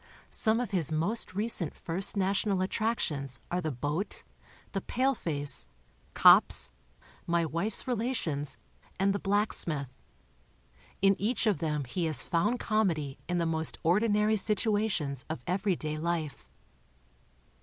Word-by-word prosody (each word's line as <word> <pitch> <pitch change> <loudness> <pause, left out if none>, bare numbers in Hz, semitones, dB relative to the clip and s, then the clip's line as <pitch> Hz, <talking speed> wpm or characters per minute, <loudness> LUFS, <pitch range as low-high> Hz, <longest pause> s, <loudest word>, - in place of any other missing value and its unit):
Some 220 0 +2
of 245 -5 -3
his 170 -6 +3
most 185 +6 -1
recent 205 -6 +2
First 185 +5 0
National 195 0 +1
attractions 165 - -2
are 180 +1 0
The 160 - -2
Boat, 150 - -2 0.5
The 195 - -3
Paleface, 165 - 0 0.5
Cops, - - +7 0.6
My 170 -1 +1
Wife's 170 - -1
Relations, 210 - -2 0.4
and 195 +1 +2
The 200 - -2
Blacksmith. 175 - -1 1.1
In 195 0 +5
each 235 +4 0
of 210 -4 +2
them 150 -3 -1
he 165 +7 -3
has 155 -2 +3
found 175 +8 0
com 215 -2 +1
edy 150 -5 -4
in 175 - 0
the 170 - 0
most 160 -1 -1
ordinary 210 +4 +2
situations 205 - 0
of 155 -6 -5
everyday 180 -5 -1
life. 165 -3 -3
180 Hz, 125 wpm, -29 LUFS, 155-210 Hz, 1.1 s, Cops